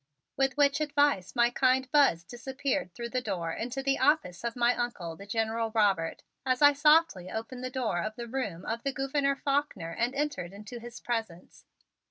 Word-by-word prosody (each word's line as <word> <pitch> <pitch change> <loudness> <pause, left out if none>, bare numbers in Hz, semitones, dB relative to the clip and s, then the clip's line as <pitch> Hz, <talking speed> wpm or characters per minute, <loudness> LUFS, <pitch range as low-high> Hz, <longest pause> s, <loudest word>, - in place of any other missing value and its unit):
With 270 +1 +1
which 285 +1 +3
advice 285 - +1
my 240 0 +4
kind 260 +1 +2
Buzz 275 - +4
disappeared 260 +2 -3
through 235 0 -5
the 255 +1 -1
door 180 -7 -3
into 250 +4 -4
the 275 0 +1
office 260 - +2
of 235 -1 -2
my 240 0 +3
Uncle, 190 -9 -3
the 200 +4 -12
General 225 +1 -1
Robert, 195 -7 +1 0.2
as 255 -1 +1
I 290 0 +7
softly 300 - +4
opened 235 +3 -5
the 255 - -2
door 245 -9 -1
of 215 +3 -4
the 235 - -6
room 220 -9 -4
of 230 +1 -3
the 275 +1 -2
Gouverneur 275 +1 0
Faulkner 275 - -1
and 245 +3 -1
entered 280 -12 -2
into 215 +4 -9
his 240 0 -9
presence. 225 -8 -5
240 Hz, 185 wpm, -29 LUFS, 215-275 Hz, 0.2 s, I